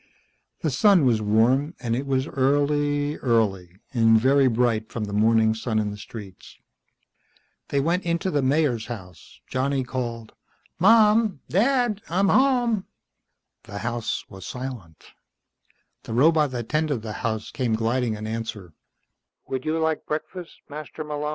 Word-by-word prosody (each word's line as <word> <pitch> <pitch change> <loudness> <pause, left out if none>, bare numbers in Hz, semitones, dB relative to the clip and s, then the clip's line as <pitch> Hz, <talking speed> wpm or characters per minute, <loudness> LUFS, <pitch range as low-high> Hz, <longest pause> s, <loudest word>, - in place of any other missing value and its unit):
The - - 0
sun 200 -9 +4
was 115 -4 +2
warm, 120 - +2
and 115 -2 -1
it 135 +3 -3
was 130 -1 +1
early, 145 +2 +1
early, 100 -8 0 0.2
and 115 -2 +5
very 135 +3 +4
bright 115 -2 0
from 115 - -4
the 100 -1 -5
morning 110 +1 +3
sun 110 0 -2
in 105 -1 0
the 105 - -8
streets. 105 -3 -11 1.1
They 140 - +1
went 170 +6 0
into 170 +2 -1
the 145 - +1
Mayor's 130 -4 +1
house. 90 -8 -10
Johnny 135 +1 -1
called, 120 -3 -5 0.5
"Mom! 215 -2 +4
Dad! 235 - +2
I'm 190 +4 +2
home." 245 -6 +2 0.8
The 105 -2 -8
house 115 0 -3
was 95 -1 -11
silent. 125 -11 -7 1.0
The - - -6
robot 150 +3 +4
that 120 -3 -5
tended 150 -6 0
the 110 -1 -5
house 110 -1 -3
came 120 -5 -1
gliding 115 +1 0
in 105 0 -7
answer. 110 -6 -5
125 Hz, 125 wpm, -24 LUFS, 110-150 Hz, 1.1 s, and